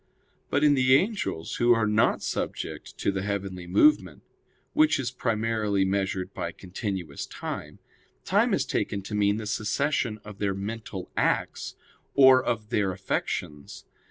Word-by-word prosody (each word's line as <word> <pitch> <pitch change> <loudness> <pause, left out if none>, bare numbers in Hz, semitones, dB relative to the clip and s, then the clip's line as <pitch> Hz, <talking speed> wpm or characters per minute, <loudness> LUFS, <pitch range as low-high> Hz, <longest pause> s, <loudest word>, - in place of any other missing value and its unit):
But 145 - +1
in 150 -1 +6
the 130 -1 +5
angels, 190 - -1
who 120 0 +5
are 115 -1 +1
not 105 +1 +2
subject - - -4
to - - 0
the 95 -1 -3
heavenly 95 -3 -4
movement, 300 - +3 0.5
which 310 0 +4
is 125 -2 -2
primarily 110 -4 0
measured 95 -1 -1
by - - -4
continuous 95 -5 -5
time, - - -6 0.5
time - - +3
is - - -1
taken 100 - -2
to 105 - -7
mean 100 0 +2
the 110 - -5
succession 110 +2 -1
of 105 -2 -10
their 100 -2 0
mental 100 -1 -6
acts, - - -1 0.4
or 130 -1 +7
of 110 -4 -2
their 100 -5 +1
affections. 75 -6 -4
105 Hz, 145 wpm, -27 LUFS, 95-120 Hz, 0.5 s, or